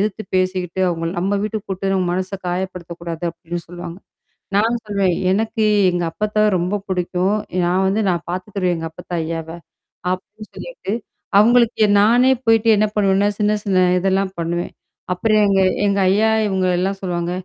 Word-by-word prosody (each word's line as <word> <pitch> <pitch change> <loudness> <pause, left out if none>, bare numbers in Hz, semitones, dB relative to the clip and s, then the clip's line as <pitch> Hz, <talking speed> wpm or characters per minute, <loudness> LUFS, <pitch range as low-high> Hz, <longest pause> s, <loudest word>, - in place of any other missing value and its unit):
எதிர்த்து 210 +1 -1
பேசிக்கிட்டு 185 -1 -1
அவங்கள 165 -1 -2
நம்ம 190 +3 0
வீட்டுக்கு 215 0 -4
குப்ட்டு 195 +1 -1
நம்ம 185 -1 +1
மனச 185 +1 -2 0.2
காயப்படுத்தக்கூடாது 175 -2 -5
அப்டின்னு 170 +1 -6
சொல்லுவாங்க. 175 0 -8 0.6
நான் 225 +4 +2
சொல்வேேன், 200 -4 +1 0.2
எனக்கு 220 +2 0 0.3
எங்க 175 -1 -1
அப்பத்த 210 +3 -2 0.2
ரொம்ப 180 +4 -1
படிக்கும். 180 +2 0 0.3
நான் 180 +2 +1
வந்து 195 +3 +1
நான் 175 - -1
பாத்துக்குருவேன் 185 0 -2
எங்க 165 0 -5
அப்பத்த 160 - -14
ஐயாவ, 165 0 -4 0.6
அப்டின்னு 210 +4 -6
சொல்லிட்டு, - - -6 0.5
அவங்களுக்கு 235 +1 +4 0.2
நானே 240 +5 +5
போயிடு 225 0 +3
என்ன 215 - +3
பண்ணுவேன்னா, 200 0 +3
சின்ன 210 0 +2
சின்ன 185 -2 +2 0.2
இதெல்லாம் 190 +1 0
பண்ணுவேன். 170 +1 -2 0.4
அப்புறம் 215 +3 +2
எங்க 195 -1 +3 0.3
எங்க 200 0 +1
ஐயா 215 +3 +3 0.2
இவங்க 190 -2 0
எல்லாம் 195 +2 -1
சொல்லுவாங்க, 175 -2 -2
190 Hz, 150 wpm, -20 LUFS, 175-210 Hz, 0.6 s, நானே